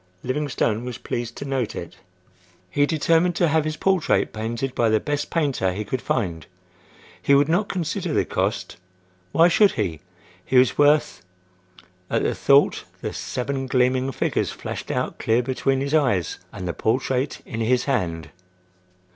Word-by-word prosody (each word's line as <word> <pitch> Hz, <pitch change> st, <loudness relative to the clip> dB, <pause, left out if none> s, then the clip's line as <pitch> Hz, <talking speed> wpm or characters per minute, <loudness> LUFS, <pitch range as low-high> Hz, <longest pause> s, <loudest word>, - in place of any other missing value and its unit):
Livingstone 130 Hz, -4 st, -1 dB
was 125 Hz, -1 st, -5 dB
pleased 120 Hz, -1 st, -5 dB
to -, -, -5 dB
note 135 Hz, -5 st, -2 dB
it. -, -, -7 dB, 0.7 s
He 145 Hz, 0 st, +2 dB
determined 165 Hz, +3 st, +2 dB
to 170 Hz, -2 st, +2 dB
have 155 Hz, 0 st, +2 dB
his 155 Hz, 0 st, -3 dB
portrait 190 Hz, -4 st, +1 dB
painted 115 Hz, +4 st, -3 dB
by 115 Hz, -2 st, +2 dB
the 110 Hz, 0 st, +3 dB
best 145 Hz, +2 st, -2 dB
painter 140 Hz, -, 0 dB
he 105 Hz, +3 st, -4 dB
could 130 Hz, +3 st, -3 dB
find. 85 Hz, -, -2 dB, 0.7 s
He 140 Hz, -, +4 dB
would 140 Hz, +1 st, +4 dB
not 180 Hz, +6 st, +1 dB
consider 175 Hz, -5 st, -2 dB
the -, -, +1 dB
cost. -, -, -2 dB, 0.5 s
Why 165 Hz, -, +5 dB
should 200 Hz, +3 st, +4 dB
he? 90 Hz, -9 st, -2 dB, 0.4 s
He 130 Hz, -, +1 dB
was 125 Hz, 0 st, +5 dB
worth—at 90 Hz, -, -1 dB
the -, -, +1 dB
thought -, -, +3 dB, 0.2 s
the -, -, -4 dB
seven 135 Hz, +1 st, -3 dB
gleaming 130 Hz, +1 st, +2 dB
figures -, -, -1 dB
flashed -, -, -6 dB
out -, -, -2 dB
clear 115 Hz, +2 st, +2 dB
between 135 Hz, +1 st, 0 dB
his 140 Hz, +2 st, -2 dB
eyes 115 Hz, -, +1 dB
and 95 Hz, -2 st, -6 dB
the 85 Hz, -, -2 dB
portrait 130 Hz, +4 st, -1 dB
in 110 Hz, -, -6 dB
his 125 Hz, +2 st, +2 dB
hand. 90 Hz, -, -2 dB
130 Hz, 155 wpm, -23 LUFS, 110-145 Hz, 0.7 s, Why